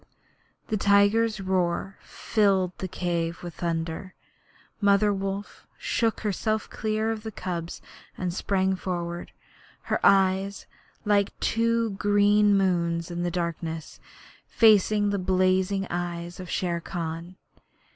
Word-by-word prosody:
The 215 - +1
tiger's 205 +2 +3
roar 185 0 -1
filled 195 -4 +1
the 190 - -3
cave 170 -1 -2
with 175 -1 -6
thunder. 165 +2 -3 0.7
Mother 200 +1 +4
Wolf 195 +1 -5
shook 225 -2 0
herself 215 +1 -1
clear 220 0 -1
of 220 -1 -4
the 220 0 -6
cubs 170 -4 -5 0.3
and 180 -2 -2
sprang 190 0 0
forward, 175 -2 -4 0.5
her - - -1
eyes, 195 0 +3 0.4
like 205 -1 +1
two 230 0 +1
green 205 +1 +3
moons 170 -3 0
in 175 0 -3
the 175 - 0
darkness, 165 -2 -4 0.5
facing 210 -2 +4
the 200 - -1
blazing 185 +1 +1
eyes 175 0 -4
of 180 -1 -8
Shere 175 -2 -1
Khan. 170 +1 -5
190 Hz, 115 wpm, -26 LUFS, 175-205 Hz, 0.7 s, Mother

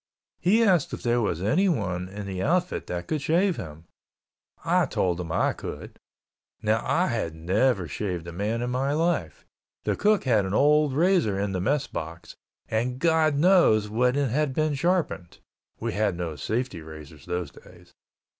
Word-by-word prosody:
He 215 +6 +3
asked 180 -9 +2
if - - -13
there 120 0 +2
was 90 -5 -1
anyone 100 - 0
in 100 +1 -7
the 95 -1 -4
outfit 180 - 0
that 90 0 -4
could 155 -2 -2
shave 175 +5 +2
him. 80 -1 -8 0.8
I - - +3
told 90 -2 0
him 85 -2 -6
I - - +1
could. - - -8 0.6
Now 110 +1 +1
I 180 +3 +1
had 110 - -2
never 95 +4 +1
shaved 90 +2 -4
a - - -6
man 105 +7 -2
in 125 - -2
my 135 +3 0
life, 155 - -1 0.4
the - - 0
cook 210 0 +2
had 115 -6 +3
an 95 +2 -2
old 150 +1 +4
razor 160 - +2
in 100 0 -1
the 95 -2 -2
Mess 140 +7 +1
box, 85 +1 -7 0.3
and 120 +3 -1
God 160 0 +2
knows 145 - +4
when 125 +3 +2
it 140 -4 0
had 140 0 0
been 155 -1 +1
sharpened, 155 - -1 0.4
(we - - -3
had 100 -1 0
no 85 -3 -4
safety 110 - -3
razors 80 -1 -12
those 90 0 -3
days). - - -18
115 Hz, 175 wpm, -26 LUFS, -, 0.8 s, old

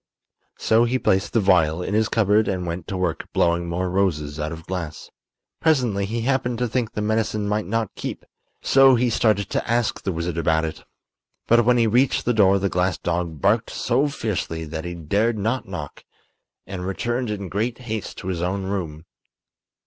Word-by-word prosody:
So 115 +2 +3
he 125 +2 +1
placed 95 -5 +1
the 115 - +4
vial 90 -4 +3
in 100 - -3
his 110 +1 +2
cupboard 105 -1 +3
and 90 -2 -2
went 85 0 -5
to 95 - -3
work 90 -3 -2
blowing 85 0 +1
more 90 +2 -1
roses 80 -6 -1
out 75 +1 -2
of 80 0 -8
glass. 85 -5 -5 0.5
Presently 125 -11 +2
he 115 +3 -2
happened 125 -1 0
to 125 +1 0
think 115 -1 -2
the 105 - -2
medicine 110 -1 0
might 105 -2 -1
not 115 0 -1
keep, - - -6 0.4
so 135 -1 +6
he 120 0 +1
started 110 -3 +2
to - - -2
ask 120 -1 0
the 95 - -2
wizard 85 0 -3
about 80 -1 +2
it. 80 - -6 0.6
But 120 0 +4
when 125 0 +4
he 115 - +4
reached 125 +4 +2
the 120 - +2
door 100 -3 +5
the 100 0 0
glass 90 -1 0
dog 85 -2 -3
barked 105 +3 +2
so 130 +4 +1
fiercely 100 - -3
that 80 +2 -6
he 85 0 -5
dared 105 +8 0
not 115 +5 -1
knock, 85 -7 -7 0.6
and 95 -2 -6
returned 120 +6 -2
in 100 -2 -4
great 110 +6 -2
haste 110 -5 -5
to 95 - -5
his 85 -2 -2
own 95 +2 -1
room. 85 -5 -4
100 Hz, 190 wpm, -23 LUFS, 85-115 Hz, 0.6 s, so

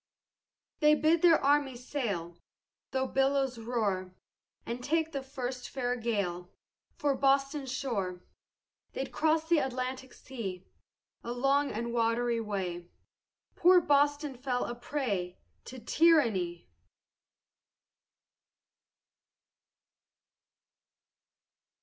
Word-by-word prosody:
They 300 0 +6
bid 315 +2 +3
their 335 -3 +6
armies 270 -3 +1
sail 180 -11 -3 0.5
Though 265 0 0
billows 270 -1 +1
roar, 205 -6 -2 0.5
And 240 +1 -5
take 320 +2 0
the 275 - -3
first 255 -2 -5
fair 245 -2 -1
gale 200 -7 -2 0.5
For 290 -1 +1
Boston's 275 0 +1
shore; 200 -10 -3 0.7
They 270 - -2
cross'd 315 +2 0
the 340 -2 +5
Atlantic 260 0 -3
sea 195 -8 -7 0.6
A 235 - -4
long 275 +3 +1
and 235 +2 -3
watery 235 0 +1
way, 180 -5 -4 0.7
Poor 360 +1 +6
Boston 290 -2 +2
fell 250 -2 -1
a 240 - -4
prey 215 -9 -3 0.3
To 260 - -9
tyranny. 230 - +2
255 Hz, 95 wpm, -30 LUFS, 225-285 Hz, 0.7 s, They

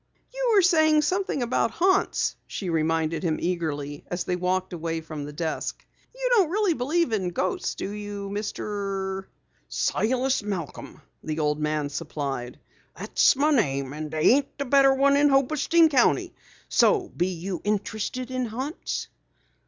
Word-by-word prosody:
"You - - +1
were 395 - +6
saying 315 -3 +4
something 370 -4 0
about 235 -1 +1
haunts," 375 - +1
she 185 -4 -4
reminded 160 0 0
him 165 -4 0
eagerly 150 -5 -3
as 175 0 -2
they 180 - -1
walked 185 +1 -1
away 165 -1 -3
from 155 -2 -7
the 145 - -7
desk. 160 +1 -4 0.3
"You - - -2
don't 395 -9 +4
really 400 0 +2
believe 310 +2 0
in 190 -4 0
ghosts 180 +1 -2
do - - -4
you, 205 -1 -6
Mister 195 -2 -3 0.2
" - - -41
"Silas 255 +3 0
Malcom," 190 -8 -6 0.2
the 155 0 -3
old 150 -1 0
man 150 -1 -1
supplied. 140 -5 -4 0.4
"That's - - +3
my 295 +3 +2
name 140 - +1
and 155 +1 -5
there 155 0 -3
ain't 270 - +5
a 280 - -1
better 275 +1 +5
one 275 +1 +4
in 290 +1 +4
Hobostein 300 +4 +4
County. 260 -5 +2 0.3
So 400 -7 +3
you 180 0 -2
be - - -23
interested 215 +5 -2
in 255 -1 -1
haunts?" 260 +8 -4
205 Hz, 155 wpm, -25 LUFS, -, 0.4 s, were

